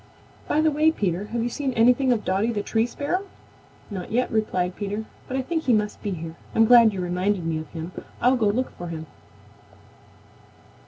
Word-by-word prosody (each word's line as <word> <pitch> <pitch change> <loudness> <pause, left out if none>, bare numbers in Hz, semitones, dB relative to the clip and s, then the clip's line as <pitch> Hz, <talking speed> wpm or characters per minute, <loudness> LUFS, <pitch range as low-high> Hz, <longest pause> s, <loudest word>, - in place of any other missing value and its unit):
By 305 - +2
the 315 0 +3
way, 305 +2 +4
Peter, 195 - -1
have 230 +2 -2
you 240 - 0
seen 270 +1 -2
anything 250 +3 +4
of 230 -3 0
Dotty 195 +5 +1
the 205 -3 -2
Tree 225 +2 +1
Sparrow?" 350 +10 -2 0.6
"Not 185 -2 -6
yet," 250 +3 +1
replied 185 -5 0
Peter, 205 +1 -4 0.2
"but 260 - -2
I 265 - -1
think 325 +3 -2
he 250 - +4
must 210 -1 0
be 205 - -3
here. 165 -3 -5 0.2
I'm 225 - +6
glad 235 -1 +7
you 195 - -5
reminded 180 +1 0
me 160 -1 -1
of 155 - -7
him. 165 +1 -6 0.3
I'll 250 +2 +4
go 225 -4 +2
look 245 +6 0
for 175 - -7
him." 160 -1 -6
220 Hz, 200 wpm, -24 LUFS, 185-250 Hz, 0.6 s, glad